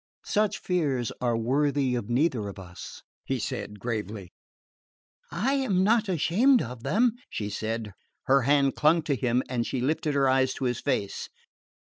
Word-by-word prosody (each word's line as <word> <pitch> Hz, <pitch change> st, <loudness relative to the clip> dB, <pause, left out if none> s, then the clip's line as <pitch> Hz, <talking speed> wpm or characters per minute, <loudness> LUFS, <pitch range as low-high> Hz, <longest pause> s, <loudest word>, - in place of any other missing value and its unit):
"Such 215 Hz, 0 st, +1 dB
fears 140 Hz, -, -1 dB
are 120 Hz, -2 st, +1 dB
worthy 135 Hz, +2 st, +1 dB
neither 120 Hz, -3 st, +1 dB
of 100 Hz, -, -9 dB
us," 90 Hz, -2 st, -10 dB, 0.2 s
he -, -, -2 dB
said 105 Hz, 0 st, -5 dB
gravely. 105 Hz, -4 st, -4 dB, 1.0 s
"I 220 Hz, +11 st, 0 dB
am 215 Hz, -10 st, +1 dB
not 220 Hz, 0 st, +3 dB
ashamed 210 Hz, -, +3 dB
of 125 Hz, 0 st, -8 dB
them," 235 Hz, -, +2 dB, 0.2 s
she 105 Hz, -1 st, -4 dB
said. 110 Hz, 0 st, -3 dB, 0.3 s
Her 135 Hz, +1 st, +4 dB
hand 140 Hz, +1 st, +3 dB
clung 160 Hz, +2 st, +3 dB
to 140 Hz, -, 0 dB
him 125 Hz, 0 st, +1 dB
and 120 Hz, -2 st, -2 dB
she 130 Hz, -, -2 dB
lifted 150 Hz, +3 st, 0 dB
her 135 Hz, -1 st, +3 dB
eyes 130 Hz, 0 st, +2 dB
to -, -, -5 dB
his 120 Hz, -1 st, 0 dB
face. 115 Hz, -8 st, -2 dB
135 Hz, 155 wpm, -27 LUFS, 115-170 Hz, 1.0 s, Her